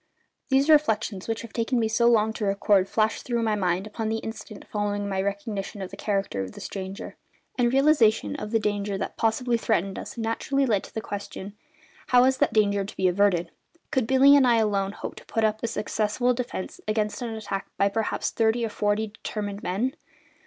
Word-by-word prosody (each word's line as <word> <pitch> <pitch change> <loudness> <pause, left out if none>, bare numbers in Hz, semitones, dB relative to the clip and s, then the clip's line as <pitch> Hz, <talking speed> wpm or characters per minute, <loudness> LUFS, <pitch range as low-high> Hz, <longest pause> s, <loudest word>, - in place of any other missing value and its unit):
These 270 +1 +3
reflections, 220 -10 +2
which 225 0 -2
have 230 - -10
taken 235 +2 0
me 225 - +2
so 230 +2 +2
long 220 -2 +3
to 215 - -3
record, 200 -1 +2
flashed 220 0 +1
through 235 -2 -1
my 220 -1 +1
mind 185 -1 0
upon 215 +1 -4
the 225 - 0
instant 220 -1 -8
following 205 -1 -2
my 190 -1 -1
recognition 200 +1 -4
of 190 -1 -6
the - - -7
character 195 - -1
of 95 -1 -6
the - - -10
stranger; 195 0 -6 0.4
and 240 -1 +2
realisation 270 -5 +3
of 210 - -5
the 225 - +2
danger 205 -2 -1
that - - -4
possibly 235 +1 +1
threatened 195 -4 0
us 270 - -8
naturally 235 +5 0
led 225 -5 +3
up - - -6
to - - -15
the 220 - -2
question: 200 -1 -7 0.5
How 250 0 +6
was 260 0 +3
that - - +3
danger 205 -2 +2
to 195 - -9
be 185 - +2
averted? 180 -2 +2 0.4
Could 255 -4 +1
Billy 270 +2 +7
and 270 -3 +5
I 240 - +5
alone 200 -3 +1
hope - - -6
to - - -12
put 225 - -1
up 215 0 +1
a 230 - -1
successful 220 +3 0
defence 240 -6 -5
against 215 +1 -1
an 230 -2 -3
attack 200 -3 -4
by 200 - +3
perhaps 220 +2 -1
thirty 230 +1 +1
or - - -3
forty 210 +1 0
determined 205 -1 -5
men? 225 +9 -1
215 Hz, 205 wpm, -26 LUFS, 200-230 Hz, 0.5 s, Billy